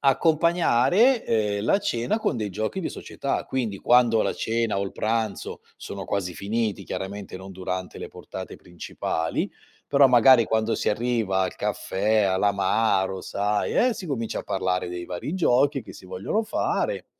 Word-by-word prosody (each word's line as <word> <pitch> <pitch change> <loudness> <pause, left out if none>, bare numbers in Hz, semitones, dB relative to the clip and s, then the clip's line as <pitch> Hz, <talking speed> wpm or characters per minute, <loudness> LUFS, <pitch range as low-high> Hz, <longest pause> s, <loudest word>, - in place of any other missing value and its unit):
accompagnare, 170 - +3
ehm, 105 -2 0
la 195 - +3
cena 130 - -1
con 220 - -1
dei 105 - -2
giochi 110 - -3
di 170 - -2
società. 140 - -4
Quindi 120 -6 -2
quando 120 -2 +4
la - - 0
cena 115 -2 -1
o - - 0
il 95 - -6
pranzo 110 -1 -2 0.2
sono 100 -1 -7
quasi 95 -3 -2
finiti, 110 0 -2
chiaramente 100 0 -6
non 95 +1 -10
durante 90 0 -5
le - - -6
portate - - -9
principali, 80 -1 -3 0.4
però 140 -1 +6
magari 125 -1 +6
quando 110 +1 0
si - - -1
arriva 110 -4 0
al 95 -1 -1
caffè, 105 +3 0
all'amaro, 95 0 +1
sai, 105 +2 -1
eh, - - +1
si 185 - -7
comincia 115 -6 -3
a - - -4
parlare 95 -2 -1
dei 90 0 -5
vari 90 - -5
giochi 140 -4 +2
che - - -11
si 95 - -13
vogliono 95 - -2
fare - - -1
110 Hz, 160 wpm, -25 LUFS, 95-130 Hz, 0.4 s, però